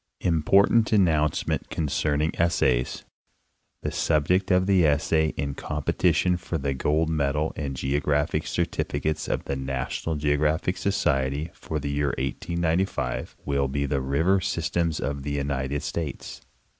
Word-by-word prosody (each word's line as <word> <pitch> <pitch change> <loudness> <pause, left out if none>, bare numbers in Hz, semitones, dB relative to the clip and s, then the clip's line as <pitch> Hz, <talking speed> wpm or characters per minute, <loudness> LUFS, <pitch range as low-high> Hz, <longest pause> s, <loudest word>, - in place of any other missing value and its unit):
IMPORTANT 95 +7 +3
ANNOUNCEMENT 80 -7 +1
CONCERNING 75 0 0
ESSAYS 65 -7 +1 0.8
The - - -2
subject 90 +5 +1
of 90 0 +3
the 95 -2 +4
Essay 80 +1 +2
in 70 -2 -2
competition 90 +5 +1
for 85 -1 -4
the 70 -2 -1
Gold 75 +4 +1
Medal 75 0 0
and 70 -3 -4
Geographic 70 +2 0
Certificates 75 +1 -1
of - - -2
the 70 - -2
NATIONAL 65 +4 -3
GEOGRAPHIC 75 +4 +1
Sociery, 70 -5 0
for 80 - -4
the 70 0 -3
year 70 -2 0
1895, 80 -1 -1
will 70 -1 +1
be 70 +1 -1
the 70 -1 -1
River 80 +9 +2
Systems 85 -1 -1
of 70 +1 -3
the 70 +1 -4
United 70 0 -2
States. 80 -4 -5
75 Hz, 130 wpm, -25 LUFS, 70-85 Hz, 0.8 s, the